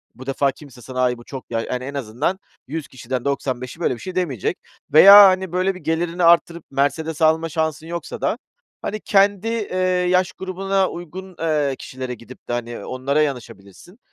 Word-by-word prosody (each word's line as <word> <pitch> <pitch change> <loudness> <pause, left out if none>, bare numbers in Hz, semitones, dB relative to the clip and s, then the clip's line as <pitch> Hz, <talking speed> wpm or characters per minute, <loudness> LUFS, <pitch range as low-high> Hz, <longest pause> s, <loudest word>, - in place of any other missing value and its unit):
bu 130 +3 -11
defa 135 +1 +1
kimse 130 -3 -15
sana 130 0 -4
“ay 125 -1 +1
bu 120 - -13
çok 130 0 -9
ya 115 -1 0
“yani 125 +2 -4
en 140 - -6
azından 140 - -2 0.3
100 155 +2 -5
kişiden 130 -1 -5
95'i 130 -1 -3
böyle 170 - +1
bir 120 - -8
şey 185 -1 -7
demeyecek. 155 - -1 0.4
Veya, 195 +6 +10
hani, 190 -1 +1
böyle, 185 +2 0
bir - - -9
gelirini 170 +2 -1
arttırıp 170 0 +4
Mercedes 155 +3 -1
alma 160 +1 +3
şansın 160 0 -2
yoksa 170 0 -6
da - - 0 0.4
hani 215 +1 -4
kendi, 200 +1 +2
eee, 225 -5 -2 0.3
yaş 185 0 +2
grubuna 190 +1 -1
uygun, 180 +2 -9
eee, 150 -4 0
kişilere 130 -1 -6
gidip 120 +1 -14
de, - - -1
hani, 120 0 -4
onlara 135 +4 0
yanaşabilirsin. 135 - -6
155 Hz, 180 wpm, -21 LUFS, 130-180 Hz, 0.4 s, Veya